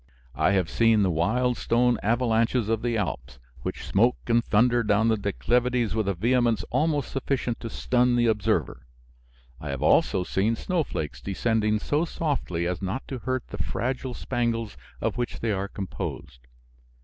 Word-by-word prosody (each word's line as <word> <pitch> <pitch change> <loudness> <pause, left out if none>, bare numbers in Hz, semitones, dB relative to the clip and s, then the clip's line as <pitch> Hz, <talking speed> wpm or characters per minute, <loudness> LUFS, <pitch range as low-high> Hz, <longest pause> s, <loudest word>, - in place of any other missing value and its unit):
I - - +2
have 95 -4 +2
seen 115 +2 +3
the 95 - +2
wild 120 +10 +1
stone 120 0 +2
avalanches 115 0 +1
of 115 -1 0
the 120 -1 0
Alps, 65 - -4 0.2
which - - -5
smoke 120 +6 +3
and 120 0 +2
thunder 120 +3 +3
down 110 +1 +2
the 110 - +3
declivities 120 +2 0
with 110 -2 -1
a 100 - 0
vehemence 120 +3 +2
almost 150 -3 0
sufficient 135 -3 -2
to 115 - -6
stun 125 +1 +1
the 120 0 +3
observer. 100 - 0 0.7
I 75 - -6
have 70 -2 -3
also 95 - +3
seen 100 +5 0
snowflakes 80 - -3
descending 105 - 0
so 145 +9 0
softly 140 - -2
as 90 +1 -2
not 100 +7 -4
to 130 - -4
hurt 130 +3 -3
the - - -7
fragile 130 +1 -3
spangles 115 -3 -2 0.3
of - - -1
which 120 - -3
they 115 - -1
are 100 0 -1
composed. 95 -10 -6
115 Hz, 160 wpm, -26 LUFS, 100-125 Hz, 0.7 s, seen